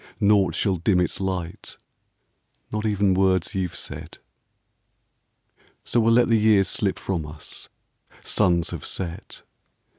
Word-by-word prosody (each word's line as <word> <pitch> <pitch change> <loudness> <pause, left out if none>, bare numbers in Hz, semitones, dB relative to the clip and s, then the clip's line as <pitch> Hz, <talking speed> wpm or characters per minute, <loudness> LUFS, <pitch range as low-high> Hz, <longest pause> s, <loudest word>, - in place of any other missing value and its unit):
Naught 100 -2 +3
shall 95 -3 +1
dim 90 +2 +2
its 90 - -1
light, 95 -3 -4 0.9
not 105 +1 -2
even 100 -2 +2
Words 95 -2 +1
you 95 -2 -1
've - - -13
said. - - -8 1.7
So 120 - 0
we 115 - +2
'11 115 - +5
let 120 0 +4
the 115 -2 +3
years 105 -4 +4
slip 105 -7 -1
from 90 -5 -3
us, 75 0 -11 0.3
— - - -28
Suns 85 -5 +1
have - - -6
set. 85 -3 -6
95 Hz, 145 wpm, -24 LUFS, 90-105 Hz, 1.7 s, 11